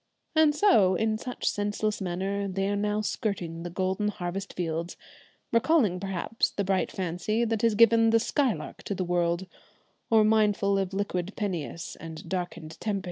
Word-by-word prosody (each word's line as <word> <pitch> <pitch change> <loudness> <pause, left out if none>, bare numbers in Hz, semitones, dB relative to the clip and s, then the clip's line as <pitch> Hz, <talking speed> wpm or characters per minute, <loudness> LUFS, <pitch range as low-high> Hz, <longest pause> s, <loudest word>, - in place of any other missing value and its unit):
And 310 -2 +5
so, 220 - +5
in 215 +3 0
such 250 +1 -5
senseless 205 +1 -1
manner, 195 +2 -2
they 195 0 -1
are 205 - 0
now 210 +1 0
skirting 180 -6 -3
the 175 - -5
golden 190 +3 -1
harvest 190 -1 -4
fields, 170 0 -3 0.5
recalling 230 - +3
perhaps 195 +3 -1
the 200 - -2
bright 190 0 0
fancy 190 +6 -1
that 225 -2 -1
has 230 -2 +3
given 230 0 +6
the 225 0 +4
'Skylark' 255 0 -1
to 200 - -2
the 185 - -2
world, 175 +1 0 0.6
or 220 -2 +5
mindful 210 -2 +3
of 190 -1 -2
"liquid 195 -1 -2
Peneus" 175 -4 -4
and 160 -1 -9
"darkened 175 -3 -5
Tempe." 210 -2 -1
200 Hz, 160 wpm, -28 LUFS, 180-215 Hz, 0.6 s, given